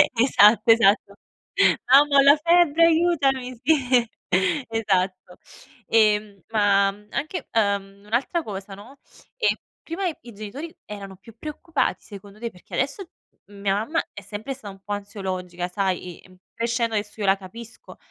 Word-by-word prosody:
Esatto 230 -2 +5
esatto. 205 -2 +3 0.8
"Mamma 280 +1 +6
ho - - +8
la 280 +2 +7
febbre, 335 -1 +5
aiutami." 280 -7 +1
sì. 255 -5 +3 0.6
Esatto. 185 -5 -1 0.5
Ehm, 210 -3 +2
ma, 200 -2 +3
mhmm, 210 +1 -18
anche 310 +3 -4
ehm, 200 -2 -1
un'altra 255 - -1
cosa, 195 -3 -7
no, 230 +8 -14 0.4
ehm - - +2 0.3
prima 345 +4 -4
i 245 -8 -7
genitori 230 +11 -8
erano 200 -2 -8
più 220 +3 -16
preoccupati 305 +2 -2
secondo 200 0 -12
te, 235 0 -4
perché 180 - -11
adesso 280 +9 -1 0.4
mia 200 -1 -2
mamma 225 +12 -1
è - - -9
sempre 220 +6 -6
stata 225 -7 -10
un 195 - -18
po' 205 - -4
ansiologica, 185 -3 -5
sai. 180 -2 -3
Ehm, 185 0 -19 0.2
crescendo 235 -1 -1
adesso 205 +1 -3
io 205 - -1
la 195 0 +4
capisco, 225 +4 -11
215 Hz, 145 wpm, -23 LUFS, 200-270 Hz, 0.8 s, ho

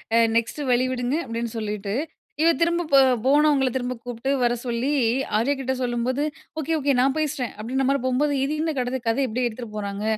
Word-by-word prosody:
அ - - +6 0.2
"next 230 +6 0
வழி 250 +1 +3
விடுங்க" 250 +1 -1
அப்டின்னு 230 0 -4
சொல்லிட்டு, 210 -2 -3 0.5
இவ 330 - +5
திரும்ப 340 +1 +2
போ 275 - +8 0.3
போனவங்கள 285 -1 +4
திரும்ப 250 -1 -1
கூப்ட்டு 245 +2 -3
வர 240 0 +3
சொல்லி 240 +2 -1 0.5
ஆர்யாகிட்ட 265 +2 0
சொல்லும்போது, 250 +3 -1 0.4
"ஓகே, 320 +2 -1
ஓகே, 280 -1 +2
நான் 265 +1 +2
பேசுறேன்." 285 -5 -2
அப்டீன்ற 260 +4 -1
மாதிரி 275 -1 +1
போம்போது, 285 +3 +1
இது 280 +2 -1
என்ன 320 -1 0
கட 255 +1 -1
கதை 235 +5 +1
இப்டி 245 +2 -1
எடுத்துட்டு 225 -2 -8
போறாங்க? 200 0 -4
255 Hz, 175 wpm, -24 LUFS, 235-280 Hz, 0.5 s, போ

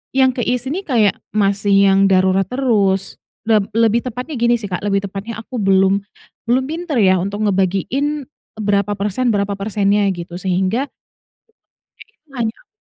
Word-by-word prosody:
yang 260 -1 +4
ke 245 - -2
isi 250 +2 -1
nih, 380 +4 -4
kayak 220 -8 +3 0.2
masih 200 -1 +3
yang 195 0 +4
darurat 190 0 +3
terus 205 -6 0 0.3
leb 215 -3 +3
lebih 230 +1 +2
tepatnya 255 +5 -5
gini 240 0 +2
sih, 210 - -6
Kak, 180 -1 -4
lebih 200 -1 0
tepatnya 205 +4 -6
aku 230 +3 -9
belum, 195 0 +3 0.4
belum 250 +3 +2
pinter 320 -3 -2
ya 190 -3 +5
untuk 205 +3 -2
ngebagiin 205 +10 -1 0.3
berapa 205 -1 +1
persen 210 +5 -1
berapa 200 -1 0
persennya 205 0 +1
gitu, 175 -1 -7
sehingga 190 +8 -1 1.1
itu 440 -9 -20
hanya 225 -2 -1
aku - - -26
205 Hz, 155 wpm, -18 LUFS, 195-245 Hz, 1.1 s, ya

